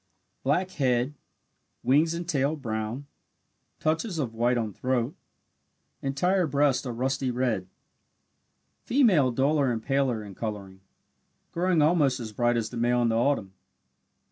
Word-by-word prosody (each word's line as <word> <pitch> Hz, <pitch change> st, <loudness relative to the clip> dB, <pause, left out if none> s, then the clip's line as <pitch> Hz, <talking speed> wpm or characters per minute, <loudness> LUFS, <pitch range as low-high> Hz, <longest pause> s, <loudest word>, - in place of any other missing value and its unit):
Black 180 Hz, +7 st, 0 dB
head 130 Hz, -3 st, +1 dB, 0.7 s
wings 155 Hz, +5 st, +3 dB
and 170 Hz, 0 st, -5 dB
tail 145 Hz, -2 st, +1 dB
brown 115 Hz, 0 st, -4 dB, 0.7 s
touches 160 Hz, +4 st, -1 dB
of 130 Hz, -7 st, -2 dB
white 120 Hz, +2 st, +1 dB
on 110 Hz, -3 st, -2 dB
throat 130 Hz, -, -1 dB, 0.9 s
entire 175 Hz, +7 st, +1 dB
breast 140 Hz, -1 st, +1 dB
a -, -, -2 dB
rusty 130 Hz, +2 st, -1 dB
red. 120 Hz, -7 st, -1 dB, 1.2 s
Female 210 Hz, -, +4 dB
duller 135 Hz, +2 st, +2 dB
and 110 Hz, -2 st, -3 dB
paler 135 Hz, -5 st, 0 dB
in 100 Hz, -1 st, -9 dB
colouring, 100 Hz, -2 st, -6 dB, 0.7 s
growing 175 Hz, -2 st, +2 dB
almost 150 Hz, -5 st, +3 dB
as 110 Hz, -3 st, -6 dB
bright 120 Hz, +2 st, +1 dB
as 110 Hz, -2 st, -2 dB
the 120 Hz, -, -6 dB
male 120 Hz, +1 st, +2 dB
in 115 Hz, -, +2 dB
the 115 Hz, -, +1 dB
autumn. 115 Hz, -5 st, +1 dB
130 Hz, 135 wpm, -27 LUFS, 115-150 Hz, 1.2 s, Female